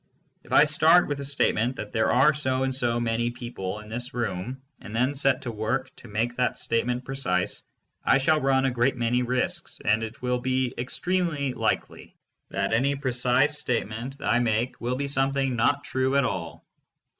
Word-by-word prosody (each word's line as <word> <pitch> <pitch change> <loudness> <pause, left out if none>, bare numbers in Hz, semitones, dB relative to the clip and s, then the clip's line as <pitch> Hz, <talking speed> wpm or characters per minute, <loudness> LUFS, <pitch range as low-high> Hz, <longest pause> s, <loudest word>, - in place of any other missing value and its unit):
If - - -17
I - - +7
start 160 +3 +5
with 145 -1 -3
the 140 - -5
statement 130 -3 +1
that 105 - -7
there 110 -1 +1
are 135 +5 +5
so 130 -3 0
and 130 0 0
so 120 -2 +1
many 120 0 0
people 120 -5 -6
in 105 - -13
this 120 +3 -4
room, 120 +3 -3 0.2
and 105 - -9
then 130 +4 +2
set 135 -2 +1
to 120 - -3
work 115 +4 -3
to - - -13
make 115 +4 -2
that 125 - 0
statement 125 +2 -1
precise, 125 -10 0 0.4
I - - +4
shall 155 +3 +2
run 135 0 +2
a 135 - +2
great 125 +2 +1
many 120 +1 +1
risks 130 +8 0
and 110 +1 +3
it 110 0 -6
will 125 0 -1
be 130 0 0
extremely 150 +1 -1
likely - - -3 0.3
that - - -1
any 135 +5 +2
precise 135 +2 +1
statement 120 -1 -3
I 120 - +2
make 115 +1 -1
will 125 +2 -1
be 140 +2 -2
something 135 -1 0
not 140 +5 +2
true 130 +1 0
at 140 -2 +3
all. 85 -9 -5
125 Hz, 185 wpm, -26 LUFS, 120-135 Hz, 0.4 s, I